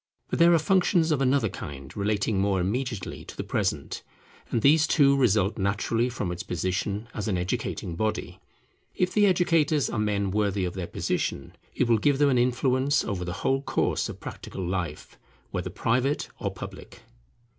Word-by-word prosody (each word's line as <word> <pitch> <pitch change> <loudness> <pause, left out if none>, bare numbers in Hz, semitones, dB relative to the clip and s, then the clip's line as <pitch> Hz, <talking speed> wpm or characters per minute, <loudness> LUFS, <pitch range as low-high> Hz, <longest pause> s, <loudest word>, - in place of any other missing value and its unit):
But - - -1
there 170 +1 +7
are 170 - +6
functions 175 0 +2
of 145 -3 +1
another 135 -3 +3
kind, 70 -7 -8
relating 100 0 0
more 100 -1 +1
immediately 110 +2 -3
to - - -11
the - - -3
present; - - -2 0.5
and 115 - -1
these 150 +2 +5
too 140 -2 +5
result 110 -5 +2
naturally 110 +5 0
from 105 -7 -3
its 90 - -4
position 95 +5 -2
as 105 -1 -4
an 95 -4 0
educating 90 -1 -3
body. 110 +4 -2 0.6
If 180 0 0
the 205 -1 +5
educators 165 - +2
are 120 - -2
men 100 -2 0
worthy 100 -2 0
of 90 - -3
their 95 -3 -4
position, 70 - -2 0.2
it 125 - +1
will 115 -2 +4
give 140 +4 +3
them 145 0 +4
an 125 -3 +3
influence 130 +3 +2
over 95 -4 -3
the 90 - -4
whole 135 0 +2
course - - 0
of - - -8
practical 95 -2 -6
life, 85 -5 -4 0.3
whether - - -3
private 130 +5 0
or - - -1
public. - - -10
110 Hz, 175 wpm, -26 LUFS, 95-140 Hz, 0.6 s, there